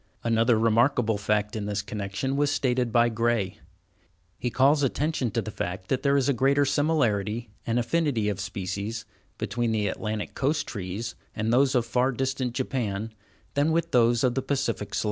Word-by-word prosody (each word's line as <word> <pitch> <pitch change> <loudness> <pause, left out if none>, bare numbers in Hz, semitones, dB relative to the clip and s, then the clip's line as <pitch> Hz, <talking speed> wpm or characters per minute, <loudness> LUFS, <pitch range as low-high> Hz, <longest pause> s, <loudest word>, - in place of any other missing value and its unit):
Another 115 0 +3
remarkable 115 0 +2
fact 105 +2 0
in 105 -2 -3
this 100 0 -2
connection 105 +6 -3
was 145 0 +2
stated 125 -4 0
by 120 +1 +4
Gray. 115 -4 0 0.8
He 125 - -1
calls 140 +4 +4
attention 140 -1 0
to 115 +1 -1
the 110 - -6
fact 95 0 -5
that 130 -1 +1
there 140 0 +3
is 135 - +2
a 140 - +3
greater 140 +3 +3
similarity, 120 -7 0 0.2
and 115 +1 +1
affinity 120 -3 +1
of 100 -2 -1
species, 100 +3 -4 0.3
between 120 +2 -1
the 105 -2 +1
Atlantic 105 +2 -3
Coast 150 +3 0
trees 100 +3 -5 0.2
and 110 +2 0
those 130 +1 +4
of 120 -2 +2
far 125 +3 +1
distant 130 -1 -2
Japan, 115 -5 -2 0.4
than 145 +3 +2
with 165 +1 0
those 120 -1 +4
of 125 -2 +3
the 135 - -1
Pacific 130 -7 -2
slope. - - +1
120 Hz, 175 wpm, -26 LUFS, 105-135 Hz, 0.8 s, by